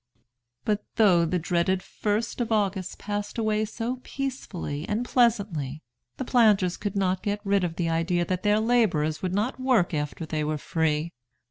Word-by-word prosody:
'" 120 0 -51
But 210 -1 0
though 185 -7 +5
the 175 +2 0
dreaded 175 +2 +1
1st 215 +6 -2
of 230 - -2
August 195 -4 0
passed 205 +1 -4
away 215 -1 +1
so 230 +3 -4
peacefully 230 - -4
and 220 +3 0
pleasantly, 200 - +1 0.3
the 260 - -3
planters 210 -8 +4
could 205 -1 -4
not 185 -1 +1
get 205 0 -1
rid 200 -1 +2
of 170 -2 -2
the 170 -1 -1
idea 170 +2 +1
that 185 0 -2
their 210 +2 +3
laborers 210 -10 +2
would 185 0 -1
not 230 +6 -1
work 250 -10 +2
after 150 +2 -3
they 155 -1 -2
were 155 0 -1
free. 160 +1 0
195 Hz, 170 wpm, -26 LUFS, 165-220 Hz, 0.3 s, though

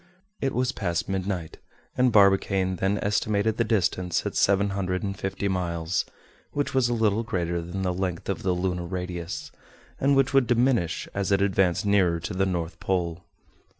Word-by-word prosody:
It 135 -3 -1
was 125 +1 +1
past 90 -9 -2
midnight; 95 -3 -3 0.4
and 125 -1 +3
Barbicane 95 -2 +3
then 95 +3 +1
estimated 105 +1 +1
the 115 - +3
distance 90 -5 0
at - - -2
seven 100 0 +3
hundred 90 -1 -2
and 100 -1 -2
fifty 95 +1 -3
miles, 85 -2 -1 0.5
which 145 0 -1
was 130 -2 +3
a 120 - +1
little 110 -1 +2
greater 85 -6 -2
than 90 +3 -5
the 90 -1 0
length 90 -2 -3
of 100 -4 -2
the 95 -1 +1
lunar 90 -1 -2
radius, 90 -1 -5 0.5
and 140 +1 +3
which 135 -1 +2
would 135 -3 +4
diminish 120 -7 +1
as 100 0 -1
it 100 - +4
advanced 95 0 +2
nearer 95 -5 +3
to 85 +5 -5
the 95 +1 +1
North 85 -2 -3
Pole. 85 -2 -1
95 Hz, 175 wpm, -26 LUFS, 90-105 Hz, 0.5 s, would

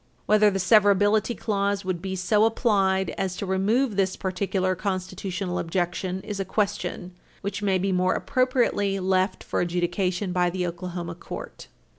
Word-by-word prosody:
Whether 210 0 +5
the 195 - -1
severability 205 +2 +4
clause 200 -2 -1
would 185 -2 -2
be 190 0 -3
so 210 +4 +3
applied 195 -5 +2
as 185 -2 -1
to 200 - -4
remove 205 +6 +1
this 190 -1 +1
particular 185 0 -1
constitutional 185 -1 -3
objection 180 +2 -2
is 205 -1 -6
a - - +1
question 185 -2 -2 0.3
which 200 0 -4
may 195 -2 +2
be 190 +1 0
more 185 0 +2
appropriately 250 -7 +1
left 185 0 0
for - - -1
adjudication 180 +2 -1
by 180 -1 +2
the 180 0 -2
Oklahoma 175 0 -5
court. 170 - -9
190 Hz, 150 wpm, -25 LUFS, 185-205 Hz, 0.3 s, Whether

